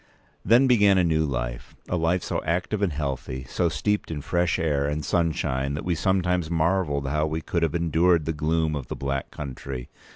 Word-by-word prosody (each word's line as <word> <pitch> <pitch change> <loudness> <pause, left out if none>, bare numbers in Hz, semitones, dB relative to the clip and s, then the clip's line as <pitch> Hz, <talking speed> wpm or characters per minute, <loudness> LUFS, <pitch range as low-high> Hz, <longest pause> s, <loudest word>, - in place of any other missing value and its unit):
Then 120 +4 +5
began 105 -6 +5
a 90 - +4
new 80 -2 +2
life—a - - -4
life 85 +1 +1
so - - -2
active 90 +5 -1
and 100 -4 +2
healthy, 65 -3 -4
so - - 0
steeped 105 0 -1
in 75 -3 -4
fresh 85 +1 +1
air 70 -3 0
and 75 0 -2
sunshine, 70 -5 0
that 75 - -5
we 90 - +1
sometimes 90 -1 +1
marvelled 80 -4 +1
how 75 +2 0
we 80 +1 -3
could 85 +2 -2
have 80 -1 0
endured 85 0 +2
the 80 - -1
gloom 80 +1 0
of 70 -3 -5
the - - -5
Black 70 0 -3
Country. 65 -3 -7
80 Hz, 190 wpm, -25 LUFS, 70-90 Hz, -, Then